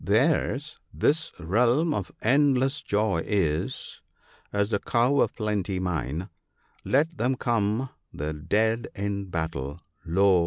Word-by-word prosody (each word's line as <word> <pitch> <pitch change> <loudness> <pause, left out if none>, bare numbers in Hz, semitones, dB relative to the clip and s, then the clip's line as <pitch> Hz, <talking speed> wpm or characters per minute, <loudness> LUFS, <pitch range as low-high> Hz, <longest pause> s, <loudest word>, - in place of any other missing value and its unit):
Theirs 140 +6 +1
this 160 +2 +1
realm 120 - +2
of 100 -8 -3
endless 135 +2 +3
joy 105 -4 +1
is, 80 -7 -1 0.5
as 100 +1 0
the 100 - +2
Cow 125 +4 +2
of - - +1
Plenty 105 -4 -1
mine; 85 -2 -2 0.6
Let 160 +5 +1
them 125 +3 +2
come 115 0 0
— - - -51
the 75 +2 -3
Dead 110 +9 +1
in 100 -1 -2
battle— 80 -4 -3 0.2
Lo! 95 +2 +4
105 Hz, 125 wpm, -26 LUFS, 90-130 Hz, 0.6 s, Lo